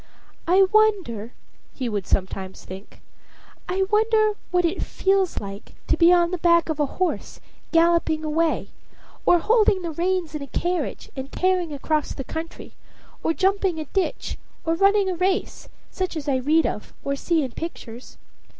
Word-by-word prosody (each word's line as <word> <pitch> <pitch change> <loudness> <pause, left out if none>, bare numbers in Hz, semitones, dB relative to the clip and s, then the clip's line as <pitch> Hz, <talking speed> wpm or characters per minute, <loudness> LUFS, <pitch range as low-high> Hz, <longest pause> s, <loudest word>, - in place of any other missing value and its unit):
"I 375 +3 +6
wonder," 385 - +2 0.4
he 255 - -3
would 205 -5 -3
sometimes 190 0 -2
think 190 +2 -11 0.7
"I 380 +1 +1
wonder 435 0 +3 0.2
what 355 -1 +2
it 335 +3 -1
feels 385 -2 +1
like 200 0 -9
to - - +2
be 340 0 +6
on 345 -1 +4
the 365 - -2
back 340 -1 +4
of 310 -1 -2
a 295 - +2
horse, 370 -2 -2 0.3
galloping 330 -2 +3
away, 320 +1 0 0.6
or 350 - +7
holding 415 0 +3
the 335 - -3
reins 345 0 -1
in 300 - -4
a 280 - -6
carriage, 345 +3 -3
and 265 0 -6
tearing 365 -3 +1
across 300 +1 -1
the 270 - -5
country, 320 +5 -7 0.5
or - - +1
jumping 385 0 +1
a 310 - -4
ditch, 385 -2 -2 0.3
or 325 - +2
running 395 +3 +3
a 375 - 0
race, 375 +3 -1 0.2
such 370 -3 -3
as 300 -1 -6
I 270 -2 +2
read 305 +5 +2
of 210 - -4
or 280 - -1
see 320 +2 +1
in 260 - -4
pictures. 245 -6 -8
335 Hz, 165 wpm, -23 LUFS, 290-375 Hz, 0.7 s, or